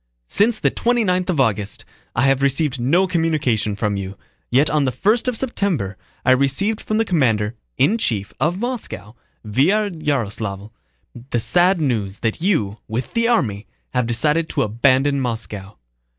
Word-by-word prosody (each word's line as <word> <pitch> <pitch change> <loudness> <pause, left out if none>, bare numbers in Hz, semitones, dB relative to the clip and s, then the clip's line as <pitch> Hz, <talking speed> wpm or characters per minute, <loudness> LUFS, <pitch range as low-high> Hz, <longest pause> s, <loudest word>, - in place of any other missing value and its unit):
Since 215 - +2
the - - +1
twenty 240 0 +1
ninth 185 -1 0
of 170 -6 0
August 105 -5 0 0.3
I - - +2
have 135 0 +3
received 140 0 +1
no 165 +11 +3
communication 155 - 0
from 105 -1 -1
you, 100 0 -6 0.3
yet 135 +5 +4
on 150 -1 +2
the 130 - +1
first 215 - +1
of 250 -2 0
September 190 - -1 0.3
I 130 - +5
received 140 +12 +2
from 215 - -1
the 225 - +2
commander 115 - +1 0.2
in 210 +12 +3
chief 105 - -1
of 160 +7 +1
Moscow, 235 - -5 0.3
via 185 - +2
Yaroslávl, 110 - -3 0.6
the 120 - 0
sad 180 - +3
news 110 -9 -1
that 115 +5 -1
you, 115 - 0
with 115 +3 -4
the 230 0 +2
army, 115 - 0 0.3
have 125 -2 +1
decided 150 +7 +1
to - - 0
abandon 130 +6 +2
Moscow. 110 - -5
135 Hz, 160 wpm, -20 LUFS, 110-180 Hz, 0.6 s, I